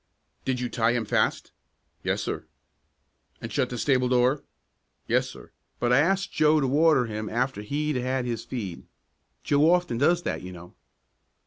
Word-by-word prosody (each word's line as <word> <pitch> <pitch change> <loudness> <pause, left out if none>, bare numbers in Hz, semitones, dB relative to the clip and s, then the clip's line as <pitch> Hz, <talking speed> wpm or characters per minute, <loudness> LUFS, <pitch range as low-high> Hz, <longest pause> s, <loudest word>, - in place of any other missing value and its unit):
"Did 130 -1 -1
you 125 - -1
tie 115 -1 +1
him 120 -2 -1
fast?" - - 0 0.5
"Yes, - - -1
sir." - - -4 0.9
"And - - -7
shut - - +1
the 125 - -5
stable 125 -1 +2
door?" 125 +3 +2 0.6
"Yes, - - +1
sir; - - -13 0.3
but 120 0 +2
I 130 - +6
asked 190 +4 +1
Joe 155 0 +4
to 140 - +1
water 150 -1 +4
him 110 -1 -5
after 125 -1 -1
he'd 145 +6 -2
had 130 0 -1
his 115 -2 -3
feed. 105 -9 -6 0.6
Joe 145 +2 +3
often 175 -10 +1
does 175 +5 +3
that, - - -3
you 90 0 -8
know." 90 0 -12
125 Hz, 165 wpm, -26 LUFS, 120-150 Hz, 0.9 s, I